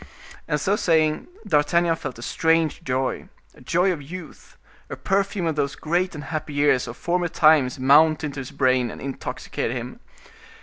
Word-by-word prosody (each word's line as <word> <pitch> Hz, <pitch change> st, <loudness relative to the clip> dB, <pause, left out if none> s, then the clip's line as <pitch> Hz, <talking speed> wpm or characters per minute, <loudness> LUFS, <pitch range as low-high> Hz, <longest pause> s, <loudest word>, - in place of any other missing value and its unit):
And 150 Hz, -, 0 dB
so 190 Hz, +8 st, +1 dB
saying, 160 Hz, -6 st, +1 dB, 0.2 s
D'Artagnan 165 Hz, +3 st, +2 dB
felt 130 Hz, -, -7 dB
a 120 Hz, -, -9 dB
strange 165 Hz, +2 st, +1 dB
joy, 130 Hz, -1 st, -2 dB, 0.2 s
a -, -, -18 dB
joy 175 Hz, +8 st, +1 dB
of 155 Hz, -, -7 dB
youth, 165 Hz, +3 st, -11 dB, 0.3 s
a -, -, -5 dB
perfume 195 Hz, -1 st, -1 dB
of 160 Hz, -2 st, 0 dB
those 140 Hz, -2 st, -1 dB
great 175 Hz, +3 st, -1 dB
and 150 Hz, -, -7 dB
happy 150 Hz, +1 st, -5 dB
years 145 Hz, -3 st, +2 dB
of 120 Hz, -, -8 dB
former 175 Hz, 0 st, 0 dB
times 155 Hz, -4 st, +3 dB
mount 155 Hz, +4 st, +4 dB
into 145 Hz, -2 st, -4 dB
his 130 Hz, -, -6 dB
brain 130 Hz, -2 st, +1 dB
and -, -, -9 dB
intoxicate 135 Hz, -1 st, -4 dB
him. -, -, -5 dB
155 Hz, 170 wpm, -23 LUFS, 140-170 Hz, 0.3 s, mount